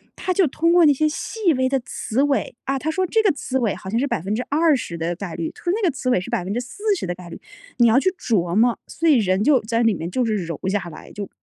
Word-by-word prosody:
它 370 - -2
就 365 -2 +3
通 335 +5 +1
过 350 -2 +6
那 295 - +6
些 310 +3 +1
细 360 +4 -1
微 260 -1 +1
的 270 0 +1
词 235 +1 -2
尾 280 -4 0
啊， 275 0 0
它 310 - -3
说 370 +4 0
这 445 +5 +2
个 415 -3 +3
词 265 -2 -3
尾 225 -5 0
好 190 - -9
像 225 +4 0
是 280 - 0
20% 250 - 0
的 170 +1 -2
概 180 -2 -6
率， 165 -1 -3
它 - - -16
说 350 - +1
那 380 - +3
个 - - +2
词 255 -1 -3
尾 245 - +3
是 180 - -7
40% 245 - -2
的 175 - -2
概 175 -1 -11
率， - - -9 0.4
你 240 -2 +5
要 235 +4 +5
去 375 - +2
琢 185 - -1
磨， 230 +2 +3
所 330 - -2
以 300 -4 +6
人 190 -2 +1
就 275 0 +4
在 230 +2 0
里 225 -2 +4
面 170 -2 -5
就 245 +7 0
是 220 -2 0
柔 165 -2 -5
下 190 -2 -1
来， 155 - -12
就 205 -1 -6
245 Hz, 275 characters per minute, -22 LUFS, 195-305 Hz, 0.4 s, 过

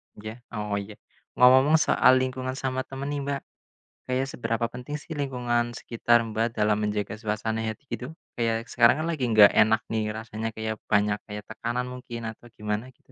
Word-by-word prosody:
Iya, 110 +1 -7 0.2
oh 105 -1 -2
iya. 100 +1 -8 0.4
Ngomong-ngomong 130 +5 +6
soal 130 - +5
lingkungan 130 0 -3
sama 130 -1 -2
temen 135 +1 -5
nih 145 -1 -2
Mbak, 140 -1 -2 0.7
kayak 130 +1 0
seberapa 115 -1 -1
penting 125 +4 -6
sih 150 +2 -9
lingkungan 120 -4 -1
sekitar 120 0 +2
Mbak, 115 +1 -2
dalam 105 -1 +2
menjaga 105 -1 -2
suasana 110 0 -2
hati 110 +3 -4
gitu 125 - -4 0.3
kayak 115 -1 +1
sekarang 120 +5 +4
kan - - -2
lagi 150 -6 -3
gak 105 -2 +9
enak 110 +1 +4
nih 110 -1 0
rasanya 110 0 -4
kayak 110 -1 -3
banyak 105 0 +2
kayak 105 -1 -6
tekanan 120 +3 -3
mungkin 120 -2 -7
atau 115 +2 -16
gimana 105 +2 -2
gitu? - - -28
115 Hz, 175 wpm, -26 LUFS, 110-130 Hz, 0.7 s, gak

